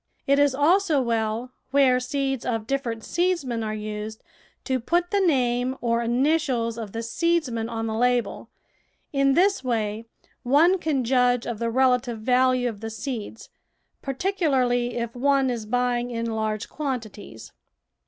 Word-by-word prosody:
It 280 +1 +3
is 285 -2 +3
also 325 +2 +3
well, 230 0 -1 0.2
where 265 -2 +4
seeds 270 0 -2
of 225 -3 -2
different 235 -3 -3
seedsmen 335 -10 -1
are 215 0 -3
used, 215 +1 -6 0.4
to 260 -2 -1
put 345 +8 0
the. 405 - +2
name 255 -7 +1
or 235 -1 0
initials 245 -1 +1
of 215 -3 -6
the 230 +2 -4
seedsman 245 -3 0
on 225 -1 -3
the 220 - -2
label. 245 +1 0 0.6
In 275 -1 +3
this 385 -2 +3
way 225 -2 -2 0.3
one 310 +9 +4
can 295 -6 0
judge 245 0 +2
of 230 -3 -4
the 230 0 -1
relative 250 -1 +2
value 250 +2 +2
of 220 -4 -5
the 225 +1 -5
seeds, 225 0 -6 0.5
particularly 265 -6 0
if 235 -1 -3
one 270 0 +2
is 225 -3 -5
buying 245 +1 0
in 230 -1 -3
large 220 0 -2
quantities. 225 - -6
245 Hz, 145 wpm, -24 LUFS, 230-275 Hz, 0.6 s, where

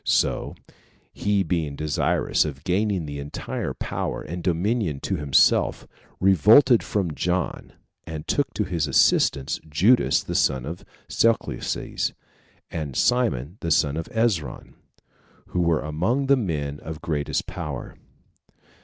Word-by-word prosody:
So - - 0 0.6
he 100 -1 +1
being 80 -5 -2
desirous 75 0 +1
of 70 -3 -6
gaining 95 -1 0
the 70 -1 -6
entire 70 +1 -5
power - - -3
and 85 +2 -6
dominion 90 - 0
to 95 - -2
himself, 75 -3 +3 0.3
revolted 110 - +6
from 95 -6 -2
John, 90 +1 -2 0.3
and 80 -2 -6
took 140 -3 0
to 105 - +1
his 85 -5 -1
assistance 70 0 +2
Judas 105 +12 +3
the - - -5
son 65 -2 +1
of 85 +4 -7 0.2
Chelcias, 115 0 0 0.6
and 75 -5 -4
Simon 90 - +1
the 85 - -3
son 75 -2 +2
of 80 0 -4
Ezron, 105 - -1 0.8
who 90 - -1
were 85 -2 +2
among 90 - 0
the 140 +1 +5
men 75 - -3
of 80 +1 -8
greatest 75 -4 -1
power. - - -6
85 Hz, 125 wpm, -24 LUFS, 75-105 Hz, 0.8 s, revolted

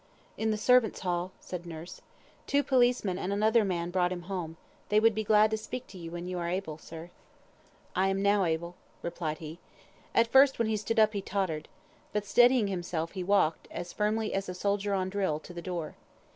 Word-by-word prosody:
"In 220 - -1
the 215 - +1
servants' 250 0 +3
hall," 180 0 -1
said 175 -1 -7
nurse. 165 +1 -8 0.5
"Two 285 0 +2
policemen 245 -8 +2
and 190 - -2
another 215 +3 +3
man 175 -3 -2
brought 180 -1 +1
him 175 -1 -4
home. 175 -3 -5 0.3
They 210 - +5
would 225 +1 +4
be 220 +1 -2
glad 215 0 +4
to 220 - +1
speak 230 +3 -6
to 190 - -11
you 165 -1 -7
when 175 +1 -6
you 180 -1 -3
are 170 0 -2
able, 175 -4 -3
sir." 165 +2 -10 0.8
"I 190 +1 +3
am 195 +1 0
able 170 -5 +2
now," - - -16 0.3
replied 170 -2 -3
he. 160 +2 -9 0.6
At 230 - +6
first 270 0 +6
when 230 - +1
he 220 - +1
stood 225 +2 -2
up, 215 0 +5
he 200 - -2
tottered. 185 -6 -2 0.5
But 210 -1 -1
steadying 245 +2 +5
himself, 175 -4 -3
he 185 -3 -4
walked, 180 -4 +2
as 175 0 -6
firmly 215 +1 0
as 195 -1 -2
a 180 - -5
soldier 200 +1 0
on 185 -1 -1
drill, 190 -6 0
to 180 - -11
the 170 - -6
door. 170 -4 -4
190 Hz, 205 wpm, -29 LUFS, 175-215 Hz, 0.8 s, At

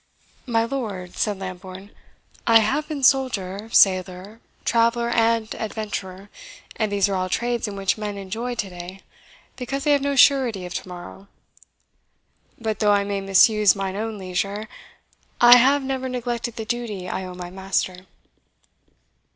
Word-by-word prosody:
"My 225 -2 +2
lord," 210 -9 -5
said 210 -2 -1
Lambourne, 190 +1 -8 0.6
"I 230 -1 +8
have 260 +8 0
been 295 -3 -5
soldier, 225 -6 +1
sailor, 185 +2 +2 0.3
traveller, 235 0 +2
and 230 -1 +1
adventurer; 205 -3 -6 0.4
and 215 -3 -1
these 200 -1 +2
are 200 - -2
all 185 -1 -1
trades 240 +2 -1
in 205 - -6
which 195 +2 -1
men 205 -1 -4
enjoy 225 +6 -4
to 205 -4 -3
day, 180 +2 -9 0.6
because 275 +2 -4
they 295 - +2
have 285 -1 +3
no 280 0 -1
surety 250 -8 +4
of 180 - -7
to - - -5
morrow. 180 +2 -10 1.3
But 220 -2 -3
though 210 -1 +3
I 200 0 +2
may 200 0 -3
misuse 200 +1 +5
mine 195 -1 -3
own 220 +1 -4
leisure, 195 +3 -3 0.7
I 240 0 +9
have 275 +3 +4
never 265 -1 -3
neglected 240 -2 -3
the 225 - -5
duty 215 -6 -4
I 190 - -3
owe 180 -1 -8
my 180 -1 -8
master." 190 -1 -3
210 Hz, 150 wpm, -23 LUFS, 190-235 Hz, 1.3 s, I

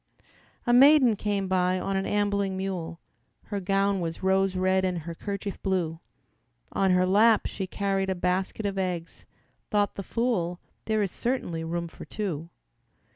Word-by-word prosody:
A 240 - +3
maiden 265 -2 +7
came 200 -1 -1
by 185 0 +1
on 195 - -2
an 195 0 -1
ambling 200 -2 0
mule, 175 -3 -4 0.4
Her 205 - -4
gown 195 +1 +1
was 165 0 -4
rose 190 0 +2
red 185 +1 +2
and 185 -1 0
her 170 +2 -6
kerchief 200 +2 -5
blue, 175 -4 -1 0.7
On 195 - +1
her 180 0 +4
lap 215 +4 +4
she 190 - -4
carried 195 0 -1
a 190 - 0
basket 185 +4 -1
of 195 -1 -1
eggs. 180 -3 -4 0.4
Thought 205 -1 +1
the - - -5
fool, 185 -5 -1 0.3
"There 215 -1 +1
is 195 - -2
certainly 235 -10 -2
room 170 +1 -3
for - - -11
two." 170 -7 -4
190 Hz, 160 wpm, -27 LUFS, 180-205 Hz, 0.7 s, maiden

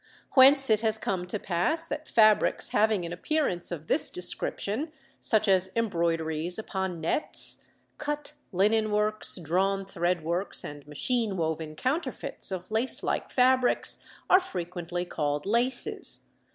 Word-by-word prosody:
Whence 270 -1 +6
it 215 -1 +3
has 220 -1 +1
come 185 -4 -3
to 195 - -2
pass 200 - +3
that 300 -1 -6
fabrics 215 -2 +3
having 210 -3 +1
an 170 - -5
appearance 180 - -2
of 160 -3 -6
this - - +1
description, 210 - -2 0.3
such 220 -1 +2
as 190 -1 +4
embroideries 170 -5 -1
upon 190 -5 -4
nets, 165 - 0 0.4
cut 295 0 -4 0.2
linen 215 +3 +2
works, 210 +1 +1
drawn 190 +4 -1
thread 175 -3 -2
works, 175 +4 -2
and 145 0 -9
machine 210 - -1
woven 160 -1 -3
counterfeits 270 - -1
of 185 +1 -6
lace 225 +4 0
like - - -2
fabrics, 255 0 +2 0.2
are 370 - +6
frequently 175 - -5
called 145 -4 -3
laces. 235 +5 +1
195 Hz, 135 wpm, -27 LUFS, 175-230 Hz, 0.4 s, Whence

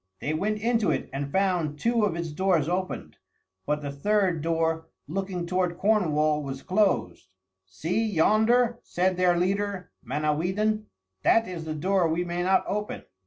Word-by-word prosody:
They 150 - -2
went 210 +7 0
into 230 -2 +1
it - - -2
and 140 +1 -3
found 180 -6 +1
two 230 +5 +2
of 175 - -1
its 170 -2 -4
doors 170 -2 +1
open, 185 +2 -3 0.5
but 150 0 -1
the 140 - -3
third 185 +2 +1
door, 165 0 0 0.2
looking 185 +1 -3
toward 180 -1 -1
Cornwall, 155 -8 +2
was 135 -1 -6
closed. 185 - 0 0.4
"See 160 - -1
yonder," 220 +7 +3
said 185 +1 0
their 180 -1 +3
leader 195 0 -1
Manawydan; 190 +9 0 0.3
"that 225 - +4
is 170 -3 -6
the 155 -1 -4
door 185 +3 +2
we 165 +2 0
may 175 0 -3
not 190 +1 +3
open." 210 +1 -3
180 Hz, 155 wpm, -26 LUFS, 155-200 Hz, 0.5 s, that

